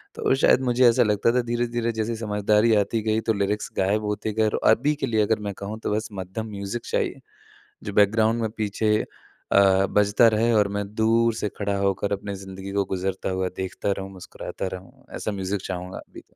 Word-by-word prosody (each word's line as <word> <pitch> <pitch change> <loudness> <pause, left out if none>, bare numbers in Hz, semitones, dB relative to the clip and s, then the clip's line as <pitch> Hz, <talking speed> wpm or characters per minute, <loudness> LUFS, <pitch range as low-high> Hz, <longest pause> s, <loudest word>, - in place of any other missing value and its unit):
तो - - +1
शायद 130 - +4
मुझे 125 0 +3
ऐसा 120 +1 +5
लगता 105 +1 +2
था 125 - +4
धीरे-धीरे 120 0 -1
जैसे 110 +1 -2
समझदारी 105 +1 +2
आती 105 +2 +1
गई 110 0 +1
तो - - +5
लिरिक्स 100 +1 -1
गायब 100 +3 +1
होते 105 +1 -2
गए 110 0 +2
और - - -1
अभी 140 +7 +2
के 135 - -2
लिए 110 -2 +2
अगर 105 +1 +1
मैं 100 - -3
कहूँ 105 +2 -6
तो - - -1
बस 110 0 -2
मध्यम 95 +3 -5
म्यूज़िक 100 +3 -5
चाहिए, - - -1 0.7
जो 100 - -4
बैकग्राउंड 110 +3 +3
में 110 - -1
पीछे 105 0 +1 0.6
अ, 95 -1 +5
बजता 105 +3 +3
रहे 115 +2 +2
और 105 -2 +3
मैं 105 - -1
दूर 115 +1 +3
से 105 - -2
खड़ा 100 -1 -1
होकर 100 +1 0
अपनी 100 0 -3
ज़िंदगी 95 0 -8
को 100 0 +1
गुज़रता 95 +1 -2
हुआ 95 0 -1
देखता 95 +1 -2
रहूँ 95 0 -6
मुस्कुराता 95 +1 -7
रहूँ, 95 0 -10
ऐसा 110 - -3
म्यूज़िक 95 0 -3
चाहूँगा 90 0 -5
अभी। - - -13
105 Hz, 200 wpm, -24 LUFS, 100-110 Hz, 0.7 s, ऐसा